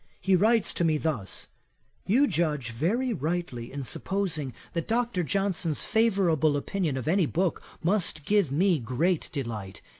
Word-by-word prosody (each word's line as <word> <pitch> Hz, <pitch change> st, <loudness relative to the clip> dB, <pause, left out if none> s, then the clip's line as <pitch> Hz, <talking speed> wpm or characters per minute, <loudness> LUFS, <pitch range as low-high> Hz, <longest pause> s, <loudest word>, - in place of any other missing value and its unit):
He 190 Hz, 0 st, +3 dB
writes 220 Hz, +3 st, +3 dB
to -, -, -1 dB
me 160 Hz, -2 st, +3 dB
thus: 145 Hz, -11 st, -3 dB, 0.6 s
"You 255 Hz, +9 st, +5 dB
judge 150 Hz, -, -1 dB
very 220 Hz, -, 0 dB
rightly 155 Hz, -, -3 dB
in 140 Hz, 0 st, -5 dB
supposing 160 Hz, -2 st, -2 dB, 0.2 s
that 170 Hz, -2 st, -2 dB
Dr. 230 Hz, -4 st, 0 dB
Johnson's 180 Hz, -4 st, 0 dB
favourable 185 Hz, -10 st, +2 dB
opinion 155 Hz, -2 st, -2 dB
of 130 Hz, -, -5 dB
any 175 Hz, 0 st, +3 dB
book 180 Hz, +3 st, 0 dB, 0.2 s
must 170 Hz, -5 st, +1 dB
give 200 Hz, -7 st, +2 dB
me 175 Hz, +3 st, +3 dB
great 140 Hz, +9 st, 0 dB
delight. 115 Hz, -9 st, -5 dB
170 Hz, 145 wpm, -27 LUFS, 145-195 Hz, 0.6 s, You